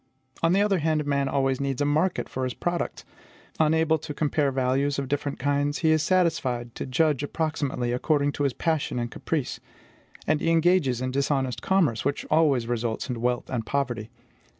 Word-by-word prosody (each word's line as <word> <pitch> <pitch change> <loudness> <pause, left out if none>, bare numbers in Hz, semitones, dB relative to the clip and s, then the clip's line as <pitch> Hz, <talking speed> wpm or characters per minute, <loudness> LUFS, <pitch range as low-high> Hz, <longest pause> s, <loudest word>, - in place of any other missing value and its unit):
On 165 - +3
the 200 +2 +4
other 200 -3 +2
hand, 155 -1 0
man 140 -1 0
always 135 -1 0
needs 135 -2 -2
a 145 - +2
market 155 +5 +1
for 130 - -4
his 130 -1 -2
products; 175 0 -3 0.5
unable 160 0 +3
to 150 0 -7
compare 145 -2 +1
values 135 +2 0
of 140 -1 -2
different 145 +1 -2
kinds, 145 +2 0
he 160 - +5
is 155 -1 +3
satisfied 155 -9 0
to - - -5
judge 150 +1 +2
approximately, 145 -5 -2
according 145 +3 +1
to 145 - -3
his 140 -3 +1
passion 160 -4 -1
and 120 -1 -2
caprice; 155 -6 -3 0.7
and 155 -1 +1
he - - +1
engages 165 -7 +3
in 130 0 -1
dishonest 135 -2 0
commerce, 165 - +2
which 140 +1 -1
always 150 -6 +3
results 120 +1 -2
in 120 -2 -4
wealth 125 0 0
and 115 -3 -2
poverty. 120 -6 -2
140 Hz, 180 wpm, -26 LUFS, 130-160 Hz, 0.7 s, he